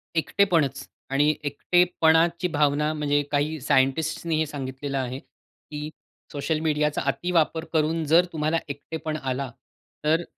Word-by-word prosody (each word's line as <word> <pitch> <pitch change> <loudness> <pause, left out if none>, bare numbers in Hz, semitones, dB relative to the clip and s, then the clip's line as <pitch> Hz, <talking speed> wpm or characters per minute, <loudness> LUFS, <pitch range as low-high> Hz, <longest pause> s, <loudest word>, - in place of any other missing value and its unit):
एकटेपणच. 160 -5 +1 0.2
आणि 145 +3 +3
एकटेपणाची 170 +3 +2
भावना 150 -1 +1
म्हणजे 145 -1 +1
काही 150 +2 0
सायंटिस्टसने 155 +5 +1
हे 155 0 +1
सांगितलेलं 140 -1 -4
आहे 130 0 -3
की 150 +1 -10 0.4
सोशल 145 +2 -1
मीडियाचा 150 -1 0
अतिवापर 165 +2 0
करून 160 +1 +1
जर 165 +4 +5
तुम्हाला 155 +1 0
एकटेपण 155 +2 -5
आला 130 0 -2 0.5
तर 160 +3 +2
150 Hz, 115 wpm, -25 LUFS, 145-160 Hz, 0.5 s, जर